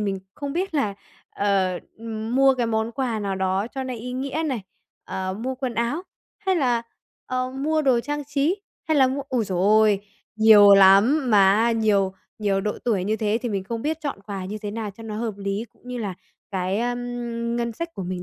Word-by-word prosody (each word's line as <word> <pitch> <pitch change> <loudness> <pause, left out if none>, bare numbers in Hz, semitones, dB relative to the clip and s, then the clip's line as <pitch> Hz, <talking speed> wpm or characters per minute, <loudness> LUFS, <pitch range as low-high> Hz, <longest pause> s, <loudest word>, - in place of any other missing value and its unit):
mình 200 -2 -1 0.2
không 285 -2 -5
biết 360 0 -2
là, 215 -9 +1 0.4
ờ, 190 -3 +1 0.2
ừm, 225 +1 -4
mua 270 0 +6
cái 245 -2 0
món 220 +1 -1
quà 250 -4 -1
nào 195 -1 -2
đó 190 +2 0
cho 265 - -2
nó 255 - -4
ý 245 +2 -6
nghĩa 275 +5 -2
này, 250 -8 -2 0.4
ờ, 190 0 -3
mua 260 +3 -2
quần 255 -2 -4
áo, 235 +9 -1 0.4
hay 380 -3 0
là 245 -6 +1 0.4
ờ 255 0 -2
mua 305 +4 0
đồ 260 -4 +3
trang 290 +3 -4
trí, 295 +8 0 0.3
hay 315 - +3
là 265 -2 +6
mua 275 +2 -2
ôi 250 -4 0
giời 185 -3 -2
ôi! 210 +1 +4 0.4
Nhiều 210 -2 +8
lắm, 210 +8 +6
mà 205 +3 +5
nhiều 205 -4 +2 0.3
nhiều 200 -2 +1
độ 210 +1 -3
tuổi 205 -6 +1
như 215 +2 0
thế 220 0 0
thì 240 - -1
mình 195 -3 -2
không 230 +3 -4
biết 315 +1 -1
chọn 285 -8 -4
quà 195 -3 -5
như 205 +3 -5
thế 205 - -3
nào 215 -1 -4
cho 215 +4 -13
nó 215 -1 -5
hợp 225 -2 -2
lý, 200 +2 -3
cũng - - -30
như 250 -1 -4
là 200 -4 -3 0.4
cái, 190 0 -1
ờm, 240 -1 -3
ngân 235 -1 -1
sách 335 +7 -6
của 190 - -5
mình 180 0 -4
230 Hz, 215 wpm, -24 LUFS, 200-260 Hz, 0.4 s, Nhiều